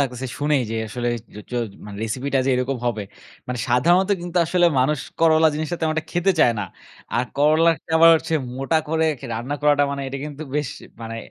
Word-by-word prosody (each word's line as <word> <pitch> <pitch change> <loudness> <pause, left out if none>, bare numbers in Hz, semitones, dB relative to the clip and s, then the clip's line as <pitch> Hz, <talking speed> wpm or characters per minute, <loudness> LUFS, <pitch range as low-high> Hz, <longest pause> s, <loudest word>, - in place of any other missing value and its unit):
লাগতেছে। 130 -1 -2
শুনেই 145 -2 +2
যে - - -3
আসলে 120 +2 -3 0.3
জ - - -11
জ - - -14 0.3
মানে 100 -1 -8
রেসিপিটা 130 +5 -1
যে - - +3
এরকম 125 +2 -1
হবে। 110 -3 -1 0.4
মানে 125 -1 -4
সাধারণত 175 +11 +3
কিন্তু 175 0 -6
আসলে 175 +1 +3
মানুষ 145 +3 +1 0.2
করলা 160 -1 +5
জিনিসটা 155 +3 -3
তেমন 155 0 0
খেতে 175 +2 +2
চায় 120 - +5
না। - - -1 0.5
আর 120 - +2
করলাটা 155 +2 +3
আবার 165 +1 +8
হচ্ছে 160 - -3 0.2
মোটা 135 +5 0
করে 160 +1 +1
খে 135 - -8
রান্না 120 +6 -3
করাটা 145 -1 +4
মানে 140 0 -3
এটা 135 - -5
কিন্তু 150 0 -7
বেশ 150 -3 0 0.3
মানে 115 0 -6
145 Hz, 190 wpm, -22 LUFS, 125-160 Hz, 0.5 s, আবার